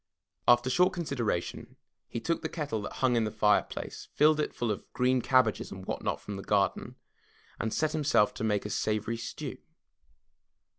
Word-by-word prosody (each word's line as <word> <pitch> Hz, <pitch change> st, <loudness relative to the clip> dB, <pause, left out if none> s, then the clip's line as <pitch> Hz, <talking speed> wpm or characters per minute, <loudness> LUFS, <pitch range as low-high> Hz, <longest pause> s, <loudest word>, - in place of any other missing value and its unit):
After 120 Hz, +1 st, +6 dB
short 180 Hz, +6 st, +4 dB
consideration, 125 Hz, -, -3 dB, 0.3 s
he 115 Hz, -, -4 dB
took 165 Hz, +8 st, -1 dB
the 160 Hz, -, -3 dB
kettle 145 Hz, -10 st, -3 dB
that 100 Hz, -, -6 dB
hung 130 Hz, -2 st, +2 dB
in 115 Hz, -, +3 dB
the 110 Hz, -, 0 dB
fireplace, 105 Hz, -1 st, 0 dB
filled 155 Hz, +1 st, +5 dB
it 150 Hz, -, 0 dB
full 120 Hz, -2 st, -2 dB
of 105 Hz, -, -6 dB
green 125 Hz, 0 st, +2 dB
cabbages 125 Hz, -3 st, +2 dB
and 95 Hz, -1 st, -8 dB
what -, -, -3 dB
not -, -, -1 dB
from 100 Hz, -1 st, -7 dB
the -, -, -5 dB
garden 100 Hz, -2 st, 0 dB, 0.6 s
and 110 Hz, -, -1 dB
set 155 Hz, +6 st, +1 dB
himself 150 Hz, -9 st, +3 dB
to -, -, -5 dB
make 105 Hz, -2 st, 0 dB
a 105 Hz, -, -4 dB
savory 110 Hz, +2 st, -1 dB
stew. 115 Hz, -, -6 dB
120 Hz, 180 wpm, -30 LUFS, 105-145 Hz, 0.6 s, After